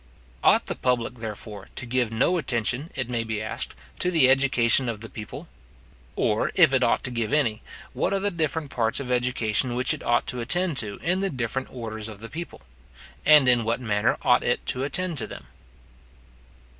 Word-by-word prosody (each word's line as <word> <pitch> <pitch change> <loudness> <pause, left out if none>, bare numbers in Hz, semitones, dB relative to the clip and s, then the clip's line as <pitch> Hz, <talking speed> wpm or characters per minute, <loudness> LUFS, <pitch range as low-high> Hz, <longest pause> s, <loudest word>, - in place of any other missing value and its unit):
Ought - - +5
the - - -3
public, 125 -1 -1
therefore, 105 -2 -8
to 125 - -1
give 125 -2 0
no 135 +11 +2
attention, 125 +2 -1
it 125 -3 -2
may 120 -2 -1
be 110 -1 -3
asked, 110 0 -2 0.2
to 180 - +2
the 155 -7 +5
education 130 -2 +4
of 110 -3 -4
the 115 +1 -9
people? 110 -1 -8 0.7
Or, - - +1
if - - +6
it - - +3
ought - - +2
to - - -3
give 115 -3 -2
any, 120 -8 +1 0.3
what - - -1
are 195 - +1
the 205 +1 -1
different 160 -3 -2
parts 115 0 0
of 130 -2 -5
education 125 -1 +1
which 125 +1 +1
it - - -7
ought 120 0 +1
to 125 - -3
attend 175 +5 0
to 105 -5 -1
in 180 +4 +1
the 195 0 0
different 130 -1 -3
orders 110 -3 -5
of 105 -2 -10
the 115 +1 -9
people? 170 +2 -7 0.7
and 150 -3 +7
in 125 -2 +4
what 115 +2 -1
manner 110 -1 +1
ought 125 - +4
it 120 - 0
to 130 - -1
attend 175 +1 -1
to - - -3
them? 65 - -10
125 Hz, 195 wpm, -25 LUFS, 115-140 Hz, 0.7 s, and